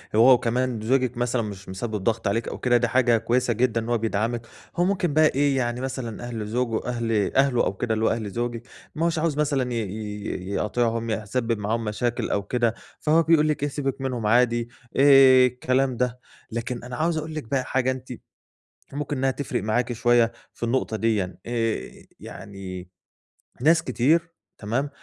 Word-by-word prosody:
هو 125 +4 +7
وكمان 120 -1 0
زوجك 125 +1 +1
مثلًا 120 0 0
مش 100 -3 -7
مسبب 110 +3 -4
ضغط 115 -1 0
عليكِ 115 +4 0
أو - - -5
كده، 120 -1 +3
دي 125 +1 +1
حاجة 120 0 +3
كويسة 120 +2 +1
جدًا 115 0 +1
إن 115 - -6
هُو 120 - +2
بيدعمك. 115 +1 -2 0.3
هُو 175 - +2
ممكن 180 -5 0
بقي 145 -2 +3
يعني 120 -1 -1
مثلًا 130 -4 -5
أهل 115 -3 -4
زوجه 115 0 -1
أهل 115 -4 -1
أهله 135 -3 +3
أو - - -1
كده 110 +4 -2
اللي 110 0 0
هُو - - +4
أهل 110 -3 -2
زوجِك، 120 +2 -3 0.3
ما 160 +2 0
هوش 165 -1 0
عاوز 155 -2 0
مثلًا 140 -5 0
ي - - -2
ي 105 -2 -5
يقاطِعهم، 115 +2 0
يح 110 0 -2
يسبب 115 +1 -1
معاهم 110 +3 -1
مشاكل 120 +3 -2
أو 100 - 0
كده، 120 +2 0 0.3
فهُو 160 +2 +3
بيقول 160 -2 +4
لِك 150 -2 -1
إيه، 145 - +1
"سيبك 135 -2 -3
منهم 125 -4 -2
عادي." 120 +1 +3 0.3
آآ، 135 -2 +7
الكلام 130 +1 0
ده. 125 0 -1 0.3
لكن 120 +1 -4
أنا 125 0 -6
عاوز 160 +4 0
أقول 155 +1 -4
لِك 155 - -3
بقى 130 +3 -1
حاجة 130 0 0
أنتِ 130 0 -7 0.8
ممكن 145 0 -3
إنّها 135 +1 +1
تفرق 130 -5 -3
معاكِ 120 +3 0
شوية 120 0 +3 0.2
في - - -9
النقطة 115 -2 0
ديًا، 105 -6 0
آآ، 115 -2 -2 0.3
يعني 95 -2 -9 0.7
ناس 160 +4 +4
كتير 160 +7 +1 0.2
تمام؟ 120 +7 -2
120 Hz, 180 wpm, -24 LUFS, 115-130 Hz, 0.8 s, هو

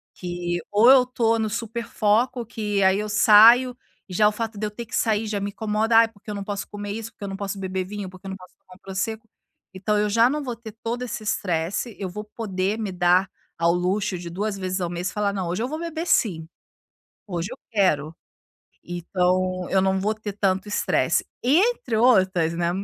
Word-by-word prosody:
Que 175 -1 -3
ou 215 +4 +6
eu 260 -2 +7
tô 230 -2 +1
no 220 - 0
super 230 +2 -4
foco, 235 +4 +1
que 210 -3 -2
aí 190 +1 +4
eu 210 0 -3
saio 230 +4 +7 0.3
e - - -7
já 210 +3 +4
o - - +3
fato 220 0 -4
de 215 - -1
eu - - -7
ter 235 +3 -7
que - - -6
sair 220 0 +1
já 210 -1 -2
me 200 - -3
incomoda, 220 +2 +1
ai 230 0 +7
porque 215 -1 -16
eu - - -4
não 200 - -4
posso 200 -1 -4
comer 205 -1 -6
isso, 225 +1 -6
porque - - -13
eu - - -4
não 195 - -5
posso 200 0 -4
beber 190 -1 -2
vinho, 200 0 -6
porque 185 +1 -12
eu - - -5
não 190 - -6
posso 185 -1 -16
tomar 185 - -18
um - - -21
Prosecco, 215 +4 -4 0.5
então, 210 +3 0
eu 210 0 +2
já 230 +3 +4
não 295 +2 -2
vou 245 -3 -4
ter 230 -1 -10
todo 235 +2 -2
esse 230 -3 -5
estresse 190 +2 -2
eu 195 - -3
vou 210 +4 -6
poder 210 -2 -3
me 210 -3 -3
dar 180 +1 +3 0.3
ao 170 +1 +3
luxo 180 +1 0
de 170 0 -7
2 200 +4 -3
vezes 185 0 -3
ao 175 - -1
mês 175 +2 -3
e - - -11
falar: 205 -1 0
"Não, 190 -3 -3
hoje 185 +6 -2
eu 245 - -1
vou 310 +3 -5
beber 335 0 -4
sim! 165 - +1 0.8
Hoje 175 -2 -3
eu 260 - -9
quero". 165 -8 +1 0.7
Então, 180 +1 -1
eu 190 - +3
não 190 0 +1
vou 210 +3 0
ter 215 -2 -7
tanto 195 0 0
estresse. 205 - +1 0.2
E 270 +5 +4
entre 470 - 0
outras, 190 -8 +3
né, 170 0 0
205 Hz, 225 wpm, -24 LUFS, 185-225 Hz, 0.8 s, eu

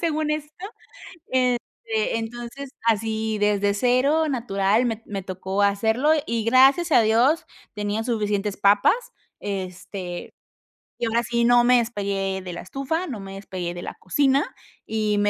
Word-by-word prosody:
según 310 -2 0
esto. 300 0 -3 0.7
Este, 255 - -1
entonces, 240 +4 -7 0.2
así, 220 0 0
desde 205 -1 +2
cero, 265 +8 +2
natural, 220 -2 +1
me 225 -2 -1
t 225 - -24
me 195 -2 -4
tocó 190 +1 -3
hacerlo, 220 +9 +2
y 230 -1 -1
gracias 270 +8 +5
a 235 - +6
Dios, 240 +9 +3 0.3
tenía 210 +1 -2
suficientes 210 -3 -1
papas, 205 - +4 0.5
este, 185 -2 -5 0.7
y 240 - 0
ahora 230 +1 +1
sí, 235 0 0
no 240 0 +5
me 250 0 +5
despegué 200 -4 -1
de 180 -1 -7
la 170 - -6
estufa, 275 - -3
no 225 -8 -5
me 195 0 -8
despegué 185 -3 -5
de 175 - -7
la - - -5
cocina 275 +7 +1 0.3
y 215 -1 0
me 205 0 +3
225 Hz, 150 wpm, -24 LUFS, 200-255 Hz, 0.7 s, a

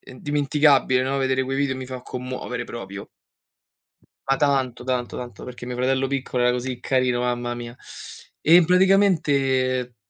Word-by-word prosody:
e - - -15
indimenticabile, 145 -1 +2
no, 135 +2 -1
vedere 130 -1 +1
quei 135 +1 -3
video 140 -2 0
mi 130 -1 -7
fa 130 -1 -7
commuovere 125 -1 -5
proprio. 100 -3 -8 1.2
Ma 135 - +3
tanto, 135 -4 0
tanto, 125 -2 -2
tanto. 125 -1 -8
Perché 125 -1 -9
mio 125 - -4
fratello 130 +2 +1
piccolo 130 -2 -2
era 125 - +4
così 125 0 -3
carino, 125 -1 0
mamma 120 0 -2
mia. 120 0 -8 0.6
E 165 - +4
in 180 - +8
praticamente 140 -10 +2
130 Hz, 155 wpm, -23 LUFS, 125-140 Hz, 1.2 s, in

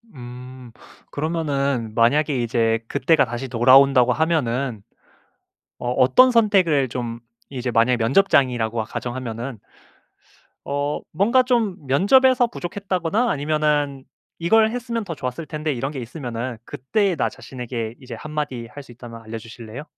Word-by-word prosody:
음 125 0 -10 0.4
그러면은 140 -7 -2
만약에 135 +3 +2
이제 115 -1 +1
그때가 140 +3 +2
다시 120 +2 -5
돌아온다고 130 +1 +5
하면은 135 -7 -1 1.0
어 120 - -3
어떤 130 - +5
선택을 190 - +3
좀 120 -1 -5 0.3
이제 130 -2 -3
만약 115 +2 +3
면접장이라고 120 - +2
가정하면은 120 +1 -5 1.1
어 145 +1 -2
뭔가 220 +10 +3
좀 235 -6 +1
면접에서 245 - +4
부족했다거나 195 +2 -2
아니면은 145 -2 0 0.3
'이걸 220 +6 +3
했으면 235 -1 -3
더 175 -5 -6
좋았을 130 +4 -5
텐데.' 155 -1 -3
이런 135 +3 -3
게 140 - -6
있으면은 120 -2 -5
그때의 195 - -1
나 - - 0
자신에게 120 -3 -6
이제 130 -3 -10
한마디 145 -4 -5
할 145 +5 -11
수 130 - -15
있다면 115 -1 -11
알려주실래요? 115 +3 -9
135 Hz, 315 characters per minute, -22 LUFS, 120-165 Hz, 1.1 s, 돌아온다고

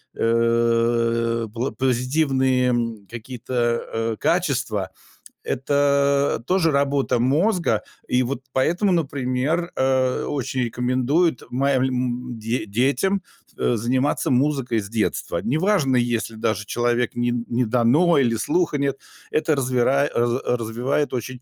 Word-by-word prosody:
э, 115 0 +1
пло 120 +3 -2
позитивные, 130 0 +1
м, 115 -4 -2
какие-то, 120 +1 -8
э, 120 -1 0 0.2
э, - - -8
качества 135 - 0 0.5
это 140 -1 +1
тоже 180 -3 +2
работа 140 -2 +1
мозга. 150 - +1 0.3
И 125 - +2
вот 130 +1 -3
поэтому, 175 +9 +1
например, 145 +1 -1
э, 130 -1 +1
очень 135 -2 -2
рекомендуют 130 +6 0
маль 135 +1 +1
э, - - +1
им 125 -1 -3
де 115 +1 -2
детям, 140 - +1 0.3
э, 120 - +1
заниматься 130 +5 0
музыкой 130 -3 +1
с 100 - -9
детства. 95 -6 -1
Неважно, 155 - +1
если 120 -2 -1
даже 110 -1 -2
человек 120 +2 0
не 120 0 0 0.2
не 120 +1 +1
дано 125 +9 +3
или 120 -4 +2
слуха 150 +5 0
нет 140 -1 -1 0.3
это 155 0 +1
развира 130 +1 +1
раз 120 +2 +1
развивает 125 +5 -1
очень, 125 +1 -5
125 Hz, 125 wpm, -22 LUFS, 120-140 Hz, 0.5 s, дано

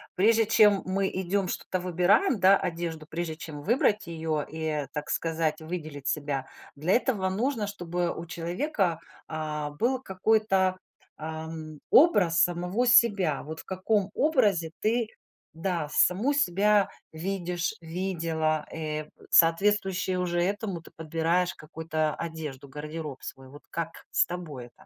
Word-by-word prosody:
Прежде 225 +4 +4
чем 210 -2 +5
мы 190 +1 0
идём 190 +1 -1
что-то 185 - -3
выбираем, 180 - +3
да, 195 +1 +7
одежду, 165 -2 -4
прежде 160 0 -4
чем 155 -3 -8
выбрать 210 -3 +2
её 160 -2 -2
и, 155 -2 -3
так 150 -1 -4
сказать, 160 -1 -1
выделить 155 -4 -6
себя 145 -2 -1 0.3
для 155 +6 -1
этого 215 -7 +1
нужно, 220 +2 -1
чтобы 175 -3 -2
у 165 - -6
человека, 175 - -1 0.3
а, 155 -1 -3
был 240 - 0
какой-то, 190 -2 +2 0.4
эм, 160 0 -6
образ 195 - +5
самого 180 +7 +1
себя. 200 - +4
Вот 160 +2 -7
в - - -22
каком 195 +1 0
образе 205 - +2
ты 230 +1 +1 0.5
да, 165 -1 -2
саму 215 +11 +3
себя 210 -5 +3 0.2
видишь, 175 0 -2
видела, 165 -3 -1
э 155 -1 -3 0.2
соответствующе 190 +2 +3
уже 175 -1 0
этому 195 -2 -2
ты - - -15
подбираешь 165 +3 0
какую-то 155 0 -2
одежду, 155 -5 -6
гардероб 150 0 -7
свой. 135 0 -7
Вот 145 +3 -14
как 165 0 -5
с - - +4
тобой 160 -8 -6
это? 120 - -19
175 Hz, 135 wpm, -28 LUFS, 160-195 Hz, 0.5 s, да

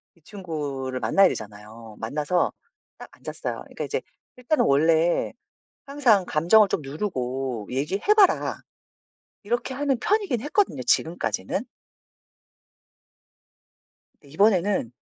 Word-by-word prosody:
이 170 - -28
친구를 145 -9 -5
만나야 125 +12 +4
되잖아요. 110 - -8
만나서 150 +9 0 0.5
딱 - - -10
앉았어요. - - -6
그러니까 - - -7
이제 - - -2 0.3
일단은 250 +5 +1
원래 160 +4 +3 0.6
항상 255 -9 +3
"감정을 175 +8 +4
좀 180 - -2
누르고 135 - -4
얘기해 150 - +1
봐라." 405 -3 +3 0.9
이렇게 240 +5 -2
하는 275 -1 0
편이긴 400 - 0
했거든요, 295 - 0
지금까지는. 170 - 0 2.6
근데 140 - -18
이번에는 195 - +2
170 Hz, 265 characters per minute, -24 LUFS, 135-220 Hz, 2.6 s, 만나야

